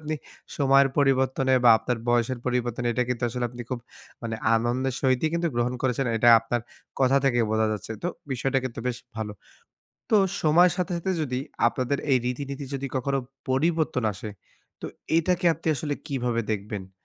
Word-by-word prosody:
আপনি 155 Hz, 0 st, -3 dB, 0.4 s
সময়ের 135 Hz, -1 st, +5 dB
পরিবর্তনে 130 Hz, -1 st, +2 dB
বা 120 Hz, -, +9 dB
আপনার 125 Hz, -2 st, -2 dB
বয়সের 120 Hz, +1 st, +1 dB
পরিবর্তনে 120 Hz, -1 st, -1 dB
এটা 125 Hz, +2 st, +1 dB
কিন্তু 125 Hz, -1 st, -2 dB
আসলে 125 Hz, +1 st, -3 dB
আপনি 120 Hz, 0 st, -7 dB
খুব 130 Hz, -, -2 dB, 0.4 s
মানে 115 Hz, -1 st, -3 dB, 0.2 s
আনন্দের 120 Hz, +3 st, 0 dB
সহিতই 130 Hz, +3 st, +2 dB
কিন্তু 170 Hz, 0 st, +1 dB
গ্রহণ 120 Hz, +1 st, 0 dB
করেছেন। 130 Hz, 0 st, 0 dB
এটা 120 Hz, +2 st, +4 dB
আপনার 120 Hz, +1 st, -2 dB, 0.4 s
কথা 135 Hz, +1 st, +4 dB
থেকে 120 Hz, -3 st, +3 dB
বোঝা 110 Hz, 0 st, +2 dB
যাচ্ছে। 105 Hz, +1 st, -5 dB
তো 175 Hz, -, 0 dB, 0.2 s
বিষয়টা 135 Hz, +2 st, 0 dB
কিন্তু 120 Hz, -3 st, -5 dB
বেশ 125 Hz, -1 st, -1 dB, 0.2 s
ভালো। 110 Hz, -1 st, -3 dB, 0.8 s
তো, 220 Hz, -, +5 dB, 0.3 s
সময়ের 170 Hz, +3 st, +5 dB
সাথে, 180 Hz, 0 st, -1 dB
সাথে, 170 Hz, +3 st, -2 dB
যদি 125 Hz, -4 st, -2 dB, 0.3 s
আপনাদের 130 Hz, +3 st, -2 dB
এই 130 Hz, -, +5 dB
রীতি-নীতি 140 Hz, +2 st, -4 dB
যদি 135 Hz, 0 st, -3 dB
কখনো 135 Hz, +1 st, 0 dB, 0.3 s
পরিবর্তন 155 Hz, -1 st, +1 dB
আসে 105 Hz, +3 st, -7 dB, 0.5 s
তো -, -, -3 dB, 0.3 s
এটাকে 180 Hz, +1 st, +1 dB
আপনি 160 Hz, 0 st, -5 dB
আসলে 145 Hz, 0 st, -2 dB
কিভাবে 125 Hz, -4 st, -1 dB
দেখবেন? 100 Hz, -2 st, -5 dB
130 Hz, 165 wpm, -26 LUFS, 120-140 Hz, 0.8 s, বা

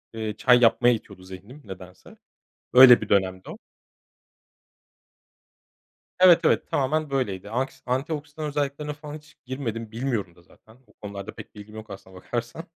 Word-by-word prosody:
ııı, 110 Hz, -2 st, -4 dB
çay 125 Hz, -1 st, +5 dB
yapmaya 120 Hz, +1 st, +4 dB
itiyordu 100 Hz, -4 st, -8 dB
zihnim 95 Hz, +10 st, -12 dB
nedense. 95 Hz, -2 st, -12 dB, 0.6 s
Öyle 125 Hz, -1 st, +9 dB
bir -, -, -6 dB
dönemdi 95 Hz, -2 st, 0 dB
o. -, -, -10 dB, 2.6 s
Evet, 180 Hz, -2 st, +7 dB
evet, -, -, +1 dB
tamamen 150 Hz, +3 st, 0 dB
böyleydi. 105 Hz, -8 st, -3 dB
Anksi 130 Hz, +4 st, -4 dB
antioksidan 145 Hz, +4 st, -4 dB
özelliklerine 145 Hz, 0 st, -3 dB
falan 150 Hz, 0 st, -10 dB
hiç 150 Hz, -1 st, -20 dB
girmedim. 115 Hz, -4 st, -5 dB
Bilmiyorum 115 Hz, -7 st, -3 dB
da 90 Hz, -, -21 dB
zaten, 110 Hz, +6 st, -22 dB
o -, -, -25 dB
konularda 100 Hz, -1 st, -9 dB
pek -, -, -12 dB
bilgim 105 Hz, +1 st, -12 dB
yok 110 Hz, 0 st, -10 dB
aslına 95 Hz, -1 st, -12 dB
bakarsan. 120 Hz, -, -5 dB
120 Hz, 140 wpm, -24 LUFS, 100-140 Hz, 2.6 s, Öyle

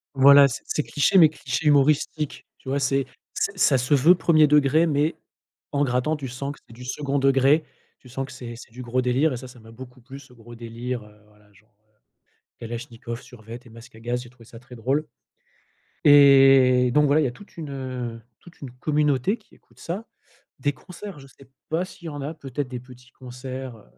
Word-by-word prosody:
Voilà, 140 Hz, +1 st, +8 dB
c'est 130 Hz, -, -6 dB
c'est 150 Hz, -, -2 dB
cliché, 155 Hz, +6 st, +2 dB
mais 160 Hz, -3 st, +9 dB
cliché 145 Hz, 0 st, -3 dB
humoristique, 150 Hz, +1 st, +1 dB
tu 130 Hz, -, -10 dB
vois, 140 Hz, -, 0 dB
c'est 135 Hz, -1 st, 0 dB, 0.3 s
c'est 195 Hz, 0 st, -2 dB
ça 140 Hz, -7 st, +4 dB
se 125 Hz, +4 st, 0 dB
veut 150 Hz, +6 st, +6 dB
1er 160 Hz, -3 st, +4 dB
degré, 150 Hz, +2 st, +4 dB
mais, 150 Hz, +2 st, 0 dB, 0.6 s
en 145 Hz, 0 st, +2 dB
grattant, 125 Hz, +4 st, 0 dB
tu 140 Hz, -3 st, -6 dB
sens 140 Hz, +3 st, -5 dB
que -, -, -18 dB
c'est 115 Hz, -, -15 dB
du 125 Hz, +2 st, -11 dB
2d 140 Hz, +1 st, -2 dB
degré, 135 Hz, +3 st, +3 dB, 0.3 s
tu -, -, -18 dB
sens 135 Hz, +2 st, -4 dB
que -, -, -13 dB
c'est 120 Hz, -2 st, -8 dB
c'est 115 Hz, -, -13 dB
du 125 Hz, +2 st, -10 dB
gros 125 Hz, +1 st, -1 dB
délire, 130 Hz, +4 st, +1 dB
et -, -, -4 dB
ça, 130 Hz, 0 st, -10 dB
ça 125 Hz, -1 st, -15 dB
m'a 115 Hz, 0 st, -15 dB
beaucoup 125 Hz, +2 st, -12 dB
plus 135 Hz, +3 st, -11 dB
ce 135 Hz, -2 st, -18 dB
gros 120 Hz, 0 st, -14 dB
délire, 115 Hz, +1 st, -6 dB
heu, 105 Hz, 0 st, -19 dB
voilà 105 Hz, -1 st, -25 dB
genre, 110 Hz, +3 st, -27 dB
heu, 110 Hz, 0 st, -42 dB, 0.7 s
kalachnikov, 115 Hz, 0 st, -7 dB
survêt 115 Hz, -2 st, -11 dB
et 120 Hz, -, -16 dB
masque 115 Hz, +1 st, -15 dB
à 110 Hz, -, -14 dB
gaz, 120 Hz, +2 st, -3 dB
j'ai -, -, -13 dB
trouvé 120 Hz, -2 st, -19 dB
ça 115 Hz, +1 st, -13 dB
très 125 Hz, +1 st, -14 dB
drôle, 135 Hz, +7 st, -1 dB, 1.0 s
et 135 Hz, -3 st, +6 dB
donc 150 Hz, 0 st, +4 dB
voilà, 145 Hz, +2 st, +3 dB
il 145 Hz, -, +1 dB
y -, -, +2 dB
a -, -, -4 dB
toute 200 Hz, +11 st, -16 dB
une, 155 Hz, -4 st, -7 dB
heu, 125 Hz, -4 st, -5 dB, 0.2 s
toute 175 Hz, -, -17 dB
une 135 Hz, -, -8 dB
communauté 150 Hz, -, 0 dB
qui 220 Hz, -, -25 dB
écoute -, -, -26 dB
ça. 195 Hz, +7 st, -5 dB, 0.5 s
Des 145 Hz, -1 st, 0 dB
concerts, 180 Hz, +3 st, -11 dB
je 135 Hz, -, -14 dB
sais 135 Hz, 0 st, -20 dB, 0.2 s
pas 165 Hz, +3 st, 0 dB
s'il 175 Hz, -2 st, -12 dB
y -, -, -3 dB
en 145 Hz, -1 st, -7 dB
a, 145 Hz, +4 st, -4 dB
peut-être 140 Hz, -3 st, -5 dB
des 125 Hz, -, -5 dB
petits 125 Hz, 0 st, -17 dB
concerts, 130 Hz, -1 st, -8 dB
heu, -, -, -18 dB
135 Hz, 220 wpm, -24 LUFS, 120-145 Hz, 1.0 s, mais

